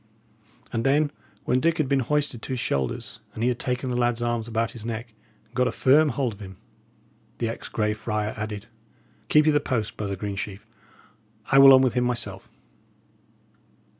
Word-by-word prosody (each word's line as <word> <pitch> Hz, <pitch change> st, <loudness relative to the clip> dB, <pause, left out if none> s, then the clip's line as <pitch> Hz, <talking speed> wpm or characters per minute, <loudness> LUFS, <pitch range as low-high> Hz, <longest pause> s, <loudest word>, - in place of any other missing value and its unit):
And 115 Hz, -1 st, 0 dB
then, 145 Hz, +3 st, +2 dB, 0.3 s
when 125 Hz, -, +2 dB
Dick 165 Hz, +4 st, +2 dB
had 155 Hz, -, +1 dB
been 140 Hz, 0 st, +2 dB
hoisted 145 Hz, -2 st, -1 dB
to 130 Hz, -, -4 dB
his 125 Hz, -, -2 dB
shoulders, 115 Hz, -, -2 dB, 0.2 s
and 110 Hz, -, -3 dB
he 125 Hz, -, +3 dB
had 125 Hz, -, -2 dB
taken 125 Hz, 0 st, -2 dB
the -, -, -1 dB
lad's 120 Hz, -1 st, +1 dB
arms 120 Hz, -1 st, -1 dB
about 115 Hz, -2 st, -1 dB
his 115 Hz, -, -8 dB
neck, 115 Hz, 0 st, -5 dB, 0.3 s
and 110 Hz, -, -33 dB
got 125 Hz, 0 st, +2 dB
a -, -, 0 dB
firm 150 Hz, +4 st, +4 dB
hold 135 Hz, -5 st, -1 dB
of 100 Hz, -, -15 dB
him, 95 Hz, -2 st, -10 dB, 0.8 s
the 115 Hz, -, -1 dB
ex 115 Hz, -, -6 dB
Grey 105 Hz, -1 st, 0 dB
Friar 105 Hz, -1 st, -2 dB
added: 105 Hz, -1 st, -5 dB, 0.6 s
"Keep 150 Hz, 0 st, +5 dB
ye 155 Hz, -, +5 dB
the 145 Hz, -, +3 dB
post, 120 Hz, -7 st, -2 dB
brother 100 Hz, -2 st, -3 dB
Greensheve. 100 Hz, +1 st, -5 dB, 0.9 s
I 135 Hz, -, +7 dB
will 135 Hz, 0 st, +10 dB
on 130 Hz, -1 st, +8 dB
with 130 Hz, -, +2 dB
him 125 Hz, 0 st, +1 dB
by -, -, +2 dB
myself." 125 Hz, -1 st, -4 dB
120 Hz, 195 wpm, -25 LUFS, 110-130 Hz, 0.9 s, will